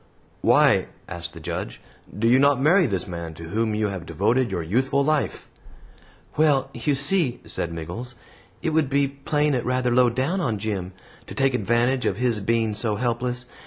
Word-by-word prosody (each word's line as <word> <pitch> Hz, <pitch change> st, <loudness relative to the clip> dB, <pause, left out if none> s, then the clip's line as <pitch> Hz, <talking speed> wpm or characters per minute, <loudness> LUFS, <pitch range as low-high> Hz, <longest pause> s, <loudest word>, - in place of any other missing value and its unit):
"Why," -, -, +4 dB, 0.2 s
asked -, -, -6 dB
the -, -, -8 dB
Judge, -, -, -5 dB, 0.4 s
"do 115 Hz, +2 st, +1 dB
you 125 Hz, +3 st, +5 dB
not 140 Hz, -1 st, +4 dB
marry 170 Hz, +5 st, +4 dB
this 95 Hz, -4 st, -2 dB
man 85 Hz, -3 st, -6 dB
to 80 Hz, +1 st, -9 dB
whom 110 Hz, +2 st, 0 dB
you 105 Hz, -1 st, 0 dB
have 90 Hz, -4 st, -6 dB
devoted 120 Hz, -, +1 dB
your 90 Hz, -4 st, -3 dB
youthful 130 Hz, -, +1 dB
life?" 155 Hz, -1 st, -1 dB, 0.9 s
"Well, 140 Hz, -3 st, +2 dB
you 145 Hz, -2 st, 0 dB
see," 140 Hz, -2 st, +2 dB
said 85 Hz, -, -2 dB
Miggles, 90 Hz, +10 st, -7 dB, 0.5 s
"it 160 Hz, -, 0 dB
would 155 Hz, -3 st, +1 dB
be 140 Hz, 0 st, +2 dB
playing 145 Hz, +2 st, -1 dB
it 125 Hz, -, 0 dB
rather 125 Hz, 0 st, 0 dB
low 125 Hz, 0 st, +5 dB
down 135 Hz, +11 st, -1 dB
on 115 Hz, -9 st, -1 dB
Jim, 100 Hz, -3 st, -4 dB, 0.3 s
to -, -, -8 dB
take 135 Hz, -1 st, +2 dB
advantage 120 Hz, +3 st, +1 dB
of 95 Hz, -, -1 dB
his 120 Hz, -2 st, 0 dB
being 115 Hz, +1 st, 0 dB
so 105 Hz, 0 st, -1 dB
helpless. 125 Hz, +2 st, -2 dB
125 Hz, 180 wpm, -24 LUFS, 105-135 Hz, 0.9 s, you